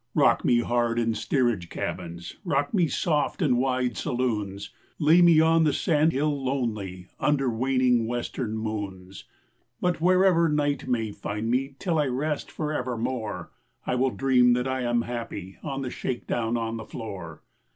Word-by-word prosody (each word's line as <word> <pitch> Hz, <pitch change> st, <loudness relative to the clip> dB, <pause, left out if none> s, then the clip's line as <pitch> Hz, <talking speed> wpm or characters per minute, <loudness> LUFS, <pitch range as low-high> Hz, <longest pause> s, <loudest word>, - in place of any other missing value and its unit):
Rock -, -, +4 dB
me 120 Hz, -1 st, +4 dB
hard 120 Hz, -1 st, 0 dB
in 115 Hz, -1 st, +1 dB
steerage 120 Hz, -, 0 dB
cabins, 85 Hz, -1 st, -5 dB
Rock 145 Hz, -6 st, 0 dB
me 180 Hz, -5 st, +3 dB
soft 150 Hz, -2 st, 0 dB
in 125 Hz, -7 st, +2 dB
first 125 Hz, -4 st, 0 dB
saloons, 105 Hz, -7 st, -2 dB, 0.3 s
Lay 160 Hz, +3 st, +5 dB
me 170 Hz, -2 st, +7 dB
on 160 Hz, +1 st, +4 dB
the 150 Hz, -, +3 dB
sandhill 150 Hz, -3 st, +1 dB
lonely 110 Hz, -9 st, -2 dB
Under 135 Hz, -4 st, +2 dB
waning 125 Hz, -1 st, +2 dB
Western 120 Hz, -1 st, -3 dB
moons; 100 Hz, -4 st, -5 dB, 0.5 s
But 180 Hz, -3 st, 0 dB
wherever 180 Hz, -2 st, +4 dB
night 145 Hz, -2 st, 0 dB
may 115 Hz, -4 st, 0 dB
find 105 Hz, +3 st, -3 dB
me 135 Hz, +2 st, 0 dB
Till 170 Hz, -2 st, 0 dB
I 150 Hz, -, +2 dB
rest 145 Hz, +4 st, -2 dB
for 155 Hz, -1 st, -3 dB
evermore 120 Hz, -, -3 dB, 0.3 s
I -, -, -1 dB
shall 130 Hz, +1 st, +2 dB
dream 125 Hz, -2 st, +4 dB
that 125 Hz, +1 st, 0 dB
I 130 Hz, 0 st, -1 dB
am 120 Hz, -1 st, +1 dB
happy 115 Hz, -6 st, -6 dB
In 135 Hz, -2 st, -3 dB
the 125 Hz, -, -4 dB
shakedown 120 Hz, -2 st, -2 dB
on 115 Hz, 0 st, -2 dB
the 110 Hz, -, -7 dB
floor. 95 Hz, -8 st, -8 dB
125 Hz, 155 wpm, -26 LUFS, 110-145 Hz, 0.5 s, me